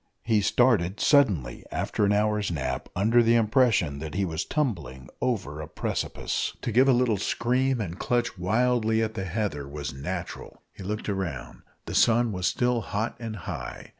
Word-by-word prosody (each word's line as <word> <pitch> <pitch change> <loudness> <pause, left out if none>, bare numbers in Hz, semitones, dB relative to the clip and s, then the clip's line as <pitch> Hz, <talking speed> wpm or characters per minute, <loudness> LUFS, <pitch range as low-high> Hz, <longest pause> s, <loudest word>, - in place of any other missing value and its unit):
He 110 -2 +2
started 105 -4 +2
suddenly 105 - +3
after 105 - 0
an 100 - +2
hour's 105 0 +1
nap, 65 -6 -3
under 110 +6 +4
the 115 0 +4
impression 110 - +2
that 80 +1 -6
he 100 0 +1
was 80 -1 -2
tumbling 80 - -3
over 95 - -2
a 80 - -7
precipice. - - -3
To - - -1
give 130 +5 +5
a - - +6
little 120 -4 +2
scream 125 +5 0
and 90 -4 -4
clutch 120 -3 0
wildly 110 +4 +1
at 110 0 -2
the 95 - -4
heather 90 -7 -3
was 75 +1 -5
natural. 85 +6 -6
He - - -12
looked 105 +3 -4
round. 90 -11 -4 0.2
The - - -6
sun 120 0 +4
was 90 -2 -1
still 125 -1 +1
hot 110 +2 -3
and 115 -2 -5
high. 70 -10 -6
105 Hz, 170 wpm, -26 LUFS, 85-120 Hz, 0.2 s, a